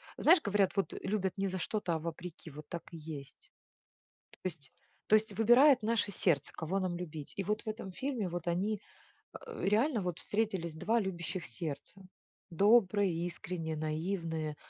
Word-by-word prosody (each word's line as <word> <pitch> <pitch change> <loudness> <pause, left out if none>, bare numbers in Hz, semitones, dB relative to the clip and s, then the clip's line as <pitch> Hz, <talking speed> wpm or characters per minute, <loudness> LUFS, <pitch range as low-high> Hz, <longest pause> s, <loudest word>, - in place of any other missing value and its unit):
знаешь, 335 +1 +6
говорят, 200 -2 +2
вот 195 - +1
любят 190 -1 0
не 195 0 0
за 185 0 -3
что-то, 180 -4 -1
а - - -1
вопреки, 170 +1 -7
вот 150 0 -11
так 170 - -5
и - - -6
есть. 150 -3 -9 0.9
То - - 0
есть 145 -6 -8 0.4
то - - +5
есть 215 0 +4
выбирает 245 +4 +7
наше 220 -1 +1
сердце, 160 -7 +1
кого 180 +4 -2
нам 185 -2 -1
любить. 160 -4 -6
И 195 - -1
вот 210 +3 -1
в - - -8
этом 215 -3 -5
фильме 255 -3 -2
вот 175 0 -4
они, 195 +4 0 0.7
э, - - -7
реально 225 +4 +3
вот 180 -2 -2
встретились 200 -6 -1
2 195 +9 +1
любящих 185 -3 -3
сердца: 150 - -6 0.5
добрые, 200 +1 +4
искренние, 170 -2 -4
наивные, 160 0 -2
185 Hz, 165 wpm, -33 LUFS, 165-210 Hz, 0.9 s, выбирает